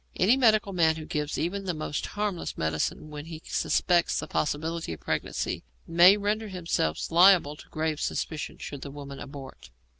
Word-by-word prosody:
Any 200 +8 +4
medical 215 -6 +3
man 160 -3 +3
who 155 -1 -7
gives 150 -1 -2
even 195 +4 -2
the 180 -3 -2
most 155 -2 -3
harmless 205 -4 -2
medicine 80 - -2
where 150 -1 -6
he 160 +1 -8
suspects 175 -1 +1
the - - -3
possibility 160 - -2
of 80 - -9
pregnancy - - -2 0.2
may 175 +4 +7
render 210 +2 -1
himself 170 - -1
liable 175 -3 +6
to - - -14
grave 155 -1 -2
suspicion 155 -2 -3
should 140 -2 -7
the 140 - -6
woman 140 -1 -8
abort. 135 - -10
160 Hz, 170 wpm, -27 LUFS, 145-185 Hz, 0.2 s, may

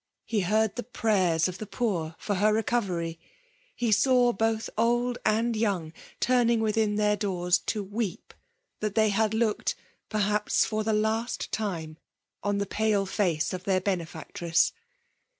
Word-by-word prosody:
He 225 - 0
heard 215 +4 +1
the - - -1
prayers 190 -8 +1
of 185 0 -6
the 215 - -6
poor 175 -10 -2
for 205 - -2
her 205 +3 +3
recovery. 195 -7 -1 0.6
He 235 -2 0
saw 245 +3 +4
both 225 +2 0
old 240 +2 +1
and 225 +2 +2
young 195 -8 -1 0.3
turning 235 -2 +3
within 215 -1 +1
their 210 0 +2
doors 180 -4 +1
to 215 -2 -1
weep 205 -1 -4 0.5
that 210 -1 -2
they 215 -1 +4
had 215 +1 +1
looked, 220 -2 0 0.3
perhaps^ 210 0 +1
for 215 0 -1
the 220 - 0
last 220 +2 -1
time 165 -7 -3 0.4
on 205 0 0
the 200 - 0
pale 210 0 +1
face 185 -6 0
of 185 0 -5
their 190 -1 +2
benefactress. 170 -2 -1
210 Hz, 150 wpm, -27 LUFS, 185-225 Hz, 0.6 s, saw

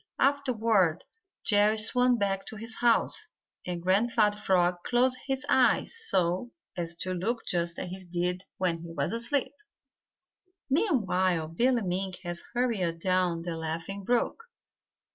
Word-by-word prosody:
Afterward 225 - +2 0.4
Jerry 210 +1 +4
swam 245 +3 +4
back 195 -2 -1
to - - -7
his 225 +1 -2
house, 240 - +2 0.4
and 175 -1 -4
Grandfather 210 +2 +2
Frog 180 -3 +2
closed 255 +1 +2
his 270 0 -2
eyes 260 -3 +3
so 185 +5 +1 0.3
as 170 -1 -3
to 185 +2 -3
look 225 +6 -2
just 170 -1 -1
as 180 - -5
he 190 0 -6
did 180 +1 -1
when 175 -3 0
he 170 +1 -9
was 145 +3 -2
asleep. 240 +5 -1 1.2
Meanwhile 185 - +1
Billy 240 +7 +2
Mink 185 0 -2
had 175 -1 -4 0.2
hurried 210 -9 0
down 180 -1 0
the 170 -1 -4
Laughing 165 +5 -5
Brook. 245 - 0
195 Hz, 135 wpm, -28 LUFS, 175-235 Hz, 1.2 s, Jerry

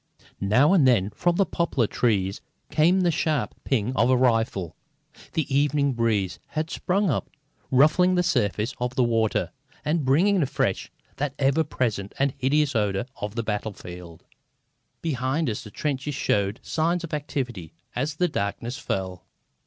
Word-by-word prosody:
Now 125 - +4
and 155 -9 +5
then 105 -5 +3
from 175 +7 +1
the 195 - +3
poplar 160 -8 0
trees 100 -4 0 0.3
came 175 +5 +4
the 175 -1 +3
sharp 155 -3 0
ping 125 -1 0
of 125 - +3
a 130 - +4
rifle. 115 -8 +1 0.6
The 145 -4 -1
evening 140 -1 +2
breeze 105 -6 0
had 155 +1 -3
sprung 195 -1 +1
up, - - -2 0.4
ruffling 160 +7 +4
the 180 - +3
surface 110 - 0
of 125 +1 -2
the 130 - +3
water, 115 -2 +1 0.3
and 155 +1 +1
bringing 175 +9 +3
afresh 140 - -1 0.3
that 140 0 -2
ever 140 +3 +2
present 110 -9 -2
and 140 -1 +1
hideous 140 +1 +2
odour 105 -1 0
of 105 +1 -5
the 115 - -1
battlefield. 90 -6 -6 0.8
Behind 140 0 0
us 110 -3 -3
the 105 - -10
trenches 140 +4 -3
showed 100 -3 0
signs 170 +2 0
of 165 - -7
activity 125 - -4 0.2
as 140 +5 -1
the 180 +3 +2
darkness 120 0 -3
fell. 95 -8 -4
130 Hz, 155 wpm, -25 LUFS, 105-155 Hz, 0.8 s, and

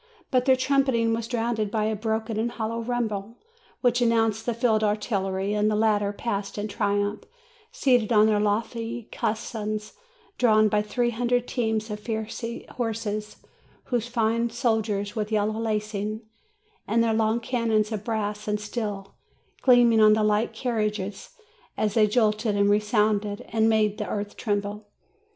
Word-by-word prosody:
But 255 -2 +2
their 265 -1 +5
trumpeting 260 -3 +2
was 225 0 -2
drowned 230 -3 -1
by 215 0 -1
a 215 0 0
broken 220 +1 -2
and 235 +2 -1
hollow 230 +1 -3
rumble, 230 -2 -3 0.4
which 245 -1 +2
announced 225 -2 +2
the 240 - +1
field 225 -2 +2
artillery; 200 -2 -1
and 210 0 +2
the 215 - +1
latter 210 -2 +2
passed 205 -2 -4
in 205 +1 -2
triumph, 205 0 -1 0.5
seated 245 -5 +2
on 215 -1 +6
their 215 -1 +3
lofty 225 +2 -2
caissons, 215 -1 -3 0.5
drawn 215 -3 +5
by 210 0 +2
three 240 +3 0
hundred 245 +1 0
teams 220 -3 -1
of 210 - -4
fiery 225 +2 -5
horses, 215 -3 -3 0.5
those 240 -2 0
fine 230 0 +1
soldiers 220 -4 -1
with 215 -1 -2
yellow 215 +1 0
lacings, 215 -1 -2 0.7
and 230 +2 +2
their 225 -1 +1
long 220 +1 +2
cannons 230 -3 0
of 215 -2 -3
brass 210 -2 -3
and 210 0 0
steel 205 -2 -5 0.5
gleaming 240 -3 +5
on 215 0 +7
the 215 0 +2
light 210 +2 +2
carriages, 210 -5 -3 0.5
as 210 -2 0
they 215 -1 +4
jolted 215 -1 +1
and 200 0 +3
resounded, 210 -1 +1
and 225 0 +2
made 215 -2 +2
the - - -3
earth 205 0 -4
tremble. 205 -1 -3
220 Hz, 150 wpm, -25 LUFS, 210-230 Hz, 0.7 s, on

